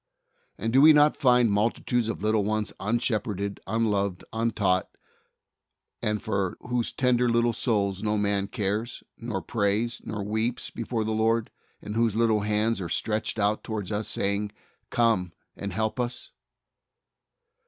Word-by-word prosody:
And 115 - -2
do 135 - +6
we 155 +1 +9
not 150 0 +5
find 125 -4 +4
multitudes 115 +3 +1
of 115 - -4
little 110 -1 +2
ones 105 +1 -1
unshep 110 +1 0
herded, 100 -1 -3
unloved, 100 -4 0
untaught, 105 -5 +1 1.1
and 105 0 0
for 100 -4 -2
whose 125 -1 -1
tender 125 -1 +2
little 120 0 +2
souls 100 -5 0
no 105 0 0
man 100 -1 0
cares, 105 +2 -2 0.2
nor 115 -5 -4
prays, 110 +2 0
nor 105 -2 -4
weeps 110 +4 -2
before 115 -1 -2
the 110 - -2
Lord, 110 +1 +1 0.3
and 105 - -5
whose 115 -2 +2
little 110 -1 +3
hands 105 +1 0
are 85 - -4
stretched 110 0 -1
out 105 0 +1
towards 110 -3 -4
us, 105 +1 -1
saying, 100 +1 -1 0.4
"Come, 110 -7 +1 0.2
and 100 - -5
help 110 +6 -1
us"? 120 0 -3
110 Hz, 145 wpm, -27 LUFS, 100-115 Hz, 1.1 s, we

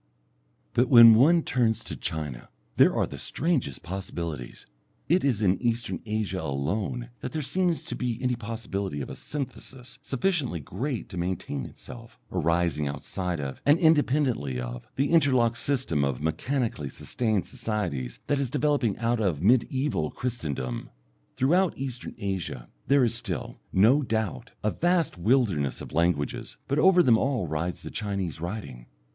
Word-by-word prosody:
But 125 +2 +3
when 115 -3 +10
one 155 +9 +5
turns 115 -3 +1
to - - -5
China 75 -6 -4 0.3
there - - +6
are - - +2
the - - -8
strangest 145 - -1
possibilities. 85 -8 -5 0.4
It 180 +4 +3
is 120 -6 +1
in 95 -1 +2
Eastern 115 -7 -1
Asia 105 -4 -1
alone 95 - -2
that 125 - -6
there 155 -1 -2
seems 175 +4 0
to - - -4
be 120 -3 -2
any 125 -1 0
possibility 105 -7 -4
of - - -6
a - - -6
synthesis 130 -2 -6
sufficiently 135 - -1
great 125 - -4
to 90 - -5
maintain 85 -7 -3
itself, 115 -2 -12
arising 85 -3 +1
outside 85 +4 -3
of, 70 -2 -5
and 145 +3 +5
independently 140 - +2
of, - - -6
the 140 +3 +1
interlocked 130 -8 +3
system 125 - 0
of 70 -3 -1
mechanically 80 - -1
sustained 110 - -1
societies 105 - -3
that 145 - +1
is 135 -3 0
developing 145 -5 +1
out 120 0 0
of 90 -9 0
mediæval 125 - +2
Christendom. 70 - -3 0.5
Throughout 175 +7 +2
Eastern 130 -2 -5
Asia 95 -10 -4 0.2
there 140 -1 +5
is 120 -1 +2
still, 110 - -4
no 115 +10 +5
doubt, 115 0 -2
a 105 - +2
vast 175 - +1
wilderness 95 - +2
of - - -9
languages, 85 -2 0
but 140 +2 +1
over 180 +1 +6
them 115 -6 +5
all 130 -7 0
rides 80 +3 -3
the - - -7
Chinese 95 -6 -3
writing. 85 - -6
110 Hz, 150 wpm, -27 LUFS, 85-130 Hz, 0.5 s, when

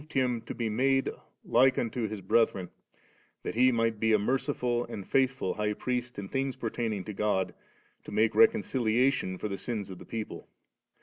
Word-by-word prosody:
353 135 - +1
Him 120 -2 -1
to - - -5
be 115 - -1
made 135 +5 +2 0.3
like 130 +2 +4
unto 115 -1 -1
Hit 100 -3 -7
brediren, 95 -6 +2 0.7
that - - -3
He 130 +3 +5
might 115 -2 +1
be 110 0 +3
a - - +6
merdftil 120 +1 0
and 100 -3 -6
foithful 130 -7 +1
High 105 0 0
Priest 125 +2 -3
in 100 -1 -5
things 135 +4 -1
pertaining 110 -3 -2
to 105 - -6
God, 100 -2 0 0.5
to - - -8
mue 110 +2 +3
reconciliation 130 - +3
for 105 - -3
the 100 -1 -4
sins 105 -5 -4
of 90 - -9
the - - -11
people. 110 -2 -6
115 Hz, 180 wpm, -29 LUFS, 105-125 Hz, 0.7 s, a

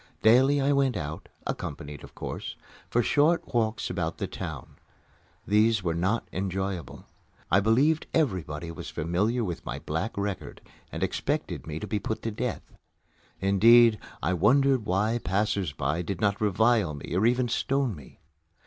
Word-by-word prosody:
Daily 130 +6 +5
I 140 +1 +2
went 135 -5 +2
out 75 -2 -6 0.2
accompanied, 75 -1 -5
of - - -13
course - - -5 0.3
for 120 - +2
short 155 +7 +2
walks 110 -2 0
about 85 -3 -3
the - - -2
town. - - -7 0.7
These 105 0 +3
were 85 -2 0
not 95 +7 0
enjoyable. 95 -4 -3 0.5
I 95 - +6
believed 130 +10 +2
everybody 85 - -1
was - - -7
familiar 100 +10 0
with 90 -5 -4
my - - -4
black 80 +10 -3
record 100 -1 -4 0.3
and - - -3
expected - - -2
me 80 0 -4
to - - -5
be 105 - -2
put 110 +3 -4
to 115 - -2
death. 105 - -3 0.8
Indeed, 110 +3 +6 0.2
I 90 - +1
wondered 125 - +3
why 105 +6 +1
passers 95 -2 0
by 75 +4 -1
did 90 0 -4
not 100 0 +1
revile 105 -6 +2
or 95 +5 +2
even 125 +1 +2
stone 135 -1 0
me. 70 -4 -15
105 Hz, 150 wpm, -27 LUFS, 90-120 Hz, 0.8 s, I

